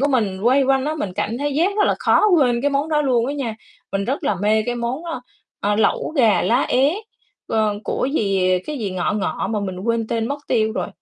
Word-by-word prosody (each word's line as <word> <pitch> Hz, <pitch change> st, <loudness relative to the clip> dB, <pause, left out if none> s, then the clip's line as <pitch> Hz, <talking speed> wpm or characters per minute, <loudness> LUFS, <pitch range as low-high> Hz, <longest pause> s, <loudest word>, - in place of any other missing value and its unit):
của 285 Hz, -, +2 dB
mình 215 Hz, -8 st, 0 dB
quây 260 Hz, +4 st, +4 dB
quanh 270 Hz, 0 st, +2 dB
á, 305 Hz, -, -1 dB
mình 190 Hz, -, -3 dB
cảm 210 Hz, +3 st, -2 dB
thấy 290 Hz, 0 st, -2 dB
giác 360 Hz, +7 st, +1 dB
rất 415 Hz, -, +4 dB
là -, -, +2 dB
khó -, -, +3 dB
quên 245 Hz, -6 st, +3 dB
cái 285 Hz, -, +2 dB
món 280 Hz, +2 st, 0 dB
đó 300 Hz, -1 st, +2 dB
luôn 245 Hz, -4 st, +2 dB
á 280 Hz, -, -2 dB
nha. 245 Hz, -6 st, -3 dB, 0.4 s
Mình 195 Hz, 0 st, -1 dB
rất 265 Hz, +7 st, -2 dB
là 205 Hz, -, +1 dB
mê 215 Hz, +1 st, +3 dB
cái 245 Hz, -, -1 dB
món, 240 Hz, +6 st, -3 dB
ơ, 325 Hz, -7 st, -4 dB, 0.4 s
ờ, 205 Hz, +1 st, +1 dB
lẩu 220 Hz, -, +1 dB
gà 230 Hz, -6 st, +4 dB
lá 245 Hz, +3 st, +2 dB
é, 275 Hz, +5 st, +3 dB, 0.5 s
ờ, 215 Hz, -1 st, +1 dB
của -, -, -1 dB
gì, 190 Hz, -7 st, +2 dB
cái 300 Hz, -3 st, -4 dB
gì 205 Hz, -4 st, -3 dB
ngọ 180 Hz, -1 st, -1 dB
ngọ 210 Hz, -2 st, -2 dB
mà 215 Hz, -2 st, -1 dB
mình 185 Hz, -2 st, -4 dB
quên 230 Hz, +2 st, -1 dB
tên 230 Hz, 0 st, -1 dB
mất 285 Hz, -, -3 dB
tiêu 220 Hz, -3 st, +1 dB
rồi. -, -, -3 dB
235 Hz, 245 wpm, -21 LUFS, 210-280 Hz, 0.5 s, quây